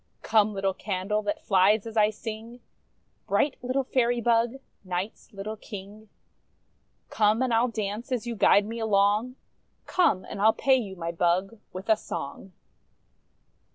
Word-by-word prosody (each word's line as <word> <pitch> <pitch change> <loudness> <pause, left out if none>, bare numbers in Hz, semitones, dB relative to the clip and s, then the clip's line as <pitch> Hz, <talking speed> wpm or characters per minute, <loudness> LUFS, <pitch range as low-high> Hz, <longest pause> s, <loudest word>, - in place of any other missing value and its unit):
Come, 215 -1 +3
little 195 0 0
candle, 200 +2 -2
that 205 -1 -3
flies 200 +2 +4
as 225 -1 -8
I 210 -1 +4
sing, 225 +2 -8 0.7
Bright 280 - +1
little 255 +2 -1
Fairy 245 -2 +1
bug, 235 +1 +2 0.3
Night's 185 +3 -5
little 210 +2 -6
King; 210 +1 -10 1.0
Come, 215 +3 +2
and 250 -2 0
I 225 - +4
'II 250 - +1
dance 215 +2 -4
as 245 -2 -1
you 235 -1 -4
guide 205 0 +4
me 230 +2 -5
along, 210 +3 +2 0.5
Come, 280 - +2
and 200 - -6
I'll 220 +1 +5
pay 275 -2 +2
you, 210 -7 -3
my 170 -2 -4
bug, 180 +5 0
with 185 +1 -8
a 220 - +5
song! 190 0 -7
215 Hz, 155 wpm, -27 LUFS, 195-230 Hz, 1.0 s, I'll